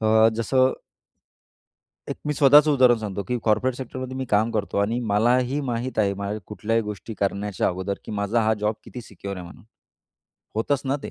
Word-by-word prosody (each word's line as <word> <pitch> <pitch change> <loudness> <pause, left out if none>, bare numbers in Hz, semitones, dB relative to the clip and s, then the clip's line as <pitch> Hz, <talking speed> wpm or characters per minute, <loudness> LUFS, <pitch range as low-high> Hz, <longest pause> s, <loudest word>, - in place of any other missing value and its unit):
अ, 110 0 +5
जसं 130 +3 +2 1.4
एक - - -3
मी 150 - +1
स्वतःचं 145 +2 +6
उदाहरण 125 -4 +5
सांगतो, 100 -2 -4
की 125 0 0
कॉर्पोरेट 115 +4 +2
सेक्टरमध्ये 130 0 -6
मी 130 - -2
काम 110 +2 +3
करतो 105 -2 -2
आणि 110 +4 +1
मलाही 125 +6 +2
माहीत 120 +1 -3
आहे, 100 -2 +3
माझ्या 100 +2 -4
कुठल्याही 110 +3 -1
गोष्टी 105 +2 -7
करण्याच्या 100 0 0
अगोदर, 95 +2 -3
की - - -7
माझा 100 +3 0
हां, 110 - +3
जॉब 105 +1 0
किती 125 - -8
सिक्योर 100 -2 -8
आहे 90 - -7
म्हणून. 85 - -13 0.9
होतच 130 +5 0
ना 135 +2 0
ते. - - -6
110 Hz, 180 wpm, -24 LUFS, 100-130 Hz, 1.4 s, स्वतःचं